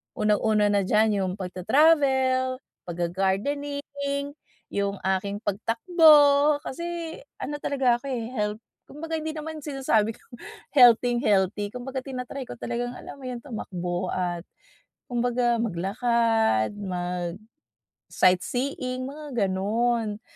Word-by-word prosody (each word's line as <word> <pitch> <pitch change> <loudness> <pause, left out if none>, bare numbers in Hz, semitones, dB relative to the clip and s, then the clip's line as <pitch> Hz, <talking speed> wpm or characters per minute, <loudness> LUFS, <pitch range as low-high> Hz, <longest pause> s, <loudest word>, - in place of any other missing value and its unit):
Unang-una 210 0 +2
na 200 -2 +2
diyan, 215 +2 +4 0.2
yung 185 - -2
pagta-travel, 260 - +2 0.3
pagga-gardening, 280 +11 -2 0.4
yung 200 0 -1
aking 200 +2 -1
pagtakbo. 290 - +5
Kasi 340 +2 -5 0.2
ano 295 +2 -4
talaga 260 -5 +1
ako - - -15
eh, 240 -3 -3
health, 210 -2 -2 0.3
kumbaga 320 +2 -5
hindi 315 0 -4
naman 315 +1 -6
sinasabi 265 -7 0
kong 240 - -16 0.3
healthing-healthy. 225 -6 +4
Kumbaga, 260 +1 -4
tinatry 260 0 -6
ko - - -7
talagang 245 +1 -4
alam 280 - -10
mo 260 - -8
yun 245 -2 -6
tumakbo 180 -8 -4
at 175 -1 -3 0.6
kumbaga 240 -1 +1
maglakad, 225 - +1 1.2
mag-sightseeing, 255 +7 -1
mga 275 -7 -2
gano'n. 215 +3 0
240 Hz, 105 wpm, -25 LUFS, 205-280 Hz, 1.2 s, pagtakbo